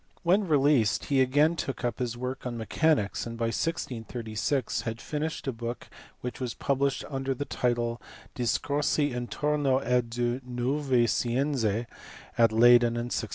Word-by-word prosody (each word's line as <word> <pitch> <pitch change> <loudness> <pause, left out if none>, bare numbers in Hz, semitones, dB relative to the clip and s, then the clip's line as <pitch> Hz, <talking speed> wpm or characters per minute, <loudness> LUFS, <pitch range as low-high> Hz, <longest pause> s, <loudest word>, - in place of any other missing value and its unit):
When 190 +3 +3
released 140 - +3
he 135 -2 +2
again 145 +6 +3
took 135 -5 -4
up 120 - -2
his 120 -2 -2
work 125 +1 -4
on 120 -1 -4
mechanics, 115 -1 +1
and 115 0 -6
by 115 0 0
1636 120 -3 -2
had 115 0 -4
finished 155 +4 -4
a 135 - 0
book 115 +1 -6 0.3
which 125 -1 -5
was 125 -3 -3
published 140 0 0
under 135 -1 -2
the 145 - -4
title 120 -2 -1 0.3
Discorsi 145 +3 0
intorno 135 +3 0
a 125 +1 +3
due 120 +1 -2
nuove 125 0 +1
scienze 120 -2 0 0.5
at 115 -1 +4
Leyden 120 +1 +6
in 120 +1 -3
1638. 110 - -2
125 Hz, 150 wpm, -28 LUFS, 120-140 Hz, 0.5 s, Leyden